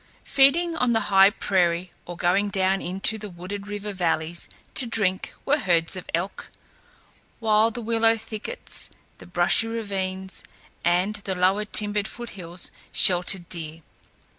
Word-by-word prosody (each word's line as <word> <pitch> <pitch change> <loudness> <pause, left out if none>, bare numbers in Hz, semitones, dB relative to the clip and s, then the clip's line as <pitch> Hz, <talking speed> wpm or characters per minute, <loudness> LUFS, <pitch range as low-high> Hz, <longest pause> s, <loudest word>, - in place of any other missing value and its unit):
Feeding 320 +5 +3
on 250 -4 +2
the 225 - +3
high 195 +1 +8
prairie 180 -3 0 0.2
or 175 -1 -7
going 190 +4 +2
down 190 0 +1
into 195 +4 +1
the 210 0 -7
wooded 190 +3 -7
river 205 0 -5
valleys 170 -2 -1 0.2
to 250 - +3
drink 195 -5 0
were 290 +2 +3
herds 170 -6 +2
of 185 - -7
elk, - - -4 0.9
while 220 0 +3
the 240 +1 -6
willow 225 0 +3
thickets, 220 - -4 0.3
the - - -12
brushy 175 +5 +2
ravines, 190 -4 -3 0.4
and 180 +5 +1
the 195 -2 -4
lower 190 +4 +2
timbered 205 0 0
foot 240 -1 -8
hills 175 -2 -5 0.2
sheltered 180 0 +2
deer. 165 -2 -5
195 Hz, 140 wpm, -25 LUFS, 180-220 Hz, 0.9 s, high